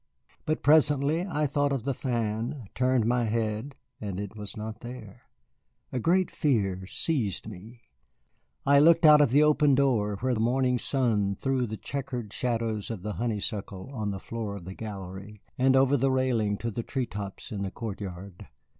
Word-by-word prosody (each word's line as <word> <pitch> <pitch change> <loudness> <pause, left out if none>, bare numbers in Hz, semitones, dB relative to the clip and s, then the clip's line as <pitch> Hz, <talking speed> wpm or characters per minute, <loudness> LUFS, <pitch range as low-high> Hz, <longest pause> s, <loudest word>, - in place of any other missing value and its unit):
But 155 0 -1
presently 150 +3 +4
I 150 -5 0
thought 145 0 +1
of 135 -5 -1
the 140 +1 -1
fan, 120 +1 -2
turned 125 -3 +2
my 120 +1 +2
head, 110 +4 -2 0.2
and 100 -3 -4
it 100 +1 -6
was 105 -1 -6
not 110 0 -6
there. 120 -4 -10 0.6
A 130 - -1
great 180 +6 +2
fear 95 - 0
seized 110 - -1
me. 110 +4 -11 0.8
I 140 0 +6
looked 165 +2 +6
out 150 -1 +9
of 145 - +4
the 145 +5 +5
open 150 -2 +4
door 120 -7 +2
where 130 0 +1
the 110 - -1
morning 125 +2 +2
sun 110 -8 +1
threw 130 +2 0
the 110 +1 -5
checkered 125 -6 -5
shadows 115 -4 -1
of 110 -6 -5
the 105 0 -3
honeysuckle 105 -1 -3
on 110 -5 -2
the 100 - -3
floor 110 -1 -5
of 95 -4 -9
the 95 - -6
gallery, 100 -1 -8
and 130 +1 +3
over 135 +1 +4
the 135 0 +2
railing 120 -6 +1
to 115 +2 -3
the 115 - -3
tree 130 +2 -2
tops 100 -3 -7
in 100 -3 -4
the 100 - -2
court 105 0 -6
yard. 95 -1 -8
115 Hz, 180 wpm, -28 LUFS, 105-135 Hz, 0.8 s, out